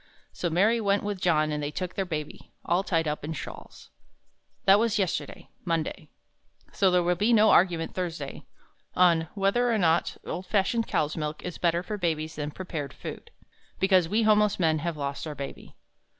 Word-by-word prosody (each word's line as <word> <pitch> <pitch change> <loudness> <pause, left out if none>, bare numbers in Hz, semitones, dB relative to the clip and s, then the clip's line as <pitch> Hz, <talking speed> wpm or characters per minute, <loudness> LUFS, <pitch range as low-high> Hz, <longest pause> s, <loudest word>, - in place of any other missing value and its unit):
So 175 - -2
Mary 210 +8 +3
went 200 -1 +1
with 205 -2 -3
John 155 -3 +2
and 150 0 -2
they 145 - -2
took 180 +4 -4
their 195 - -2
Baby, 150 -3 -6
all 175 +2 +2
tied 165 -4 0
up 150 0 -3
in 155 +2 -3
shawls. 115 -7 -10 0.7
That 195 +1 +7
was 230 -1 +1
yesterday 190 -4 -3
Monday 165 -2 -2 0.6
so 195 - +3
there 180 -1 +3
will 175 +1 +2
be 210 +7 +1
no 220 -1 +6
argument 170 -3 +3
Thursday 165 -6 -5 0.5
on 170 -3 +4
"Whether 210 +5 +2
or 225 - +2
not 170 -3 +1
old 185 +1 -5
fashioned 220 +4 +1
cow's 150 0 0
milk 150 -1 -4
is 180 - -6
better 170 0 +1
for 210 +2 -5
babies 160 -3 -1
than 150 -1 -3
prepared 155 -4 -6
foods." - - -8 0.5
Because 185 -3 +3
we 220 +4 +2
homeless 210 -2 +3
men 160 -3 +2
have 165 0 -3
lost 140 +2 -4
Our 150 - -5
Baby. 140 -1 -8
175 Hz, 180 wpm, -27 LUFS, 155-195 Hz, 0.7 s, That